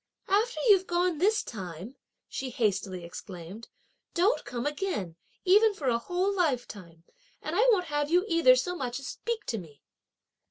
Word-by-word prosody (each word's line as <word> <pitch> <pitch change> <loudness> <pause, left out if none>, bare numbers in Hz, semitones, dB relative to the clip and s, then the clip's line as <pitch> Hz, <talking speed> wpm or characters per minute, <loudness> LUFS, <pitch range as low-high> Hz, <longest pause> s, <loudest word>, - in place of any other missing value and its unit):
"After 435 +5 +1
you've 385 -3 +5
gone 350 -2 +1
this 425 +5 +3
time," 190 - -8 0.3
she 265 - -4
hastily 195 -6 -1
exclaimed, 180 +4 -9 0.5
"don't 385 +7 +2
come 240 +1 -4
again, 290 - -2 0.3
even 415 +3 +5
for 280 -8 -1
a 235 -1 +1
whole 360 +9 -1
lifetime; 220 - -2 0.4
and 310 - -4
I 465 +6 +4
won't 370 -5 +2
have 295 -2 -1
you 355 +4 +3
either 330 -8 +6
so 360 +8 -1
much 250 -5 -3
as 275 - -8
speak 465 -2 -4
to 225 - -2
me!" 150 -6 -14
290 Hz, 160 wpm, -28 LUFS, -, 0.5 s, either